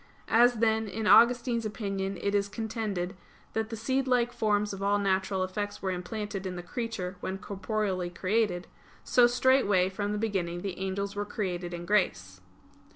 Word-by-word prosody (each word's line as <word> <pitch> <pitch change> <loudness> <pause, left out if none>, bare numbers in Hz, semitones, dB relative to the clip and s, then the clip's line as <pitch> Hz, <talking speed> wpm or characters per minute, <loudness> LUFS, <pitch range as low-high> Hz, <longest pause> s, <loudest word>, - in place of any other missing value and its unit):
As, 240 +2 +6
then, 220 -1 +2
in 220 +2 -4
Augustine's 235 +1 +5
opinion 195 -3 -3
it 200 - 0
is 200 0 +1
contended 210 -4 -3 0.4
that 220 0 -1
the 230 - -4
seedlike 250 +1 +1
forms 210 -3 +1
of 195 - -7
all 200 +1 +2
natural 190 -1 +1
effects 205 +2 -3
were 190 - 0
implanted 195 +1 -4
in 180 - -5
the 175 - -6
creature 190 -2 -4
when 190 +1 -4
corporeally 195 -2 -2
created, 185 0 0 0.4
so 245 -1 +5
straightway 240 -7 +3
from 205 +2 -3
the 210 - -1
beginning 185 -5 -2
the 190 -3 -4
angels 195 +1 -3
were 205 - -1
created 180 -4 -3
in 175 0 -6
grace. 95 - 0
205 Hz, 160 wpm, -29 LUFS, 185-225 Hz, 0.4 s, As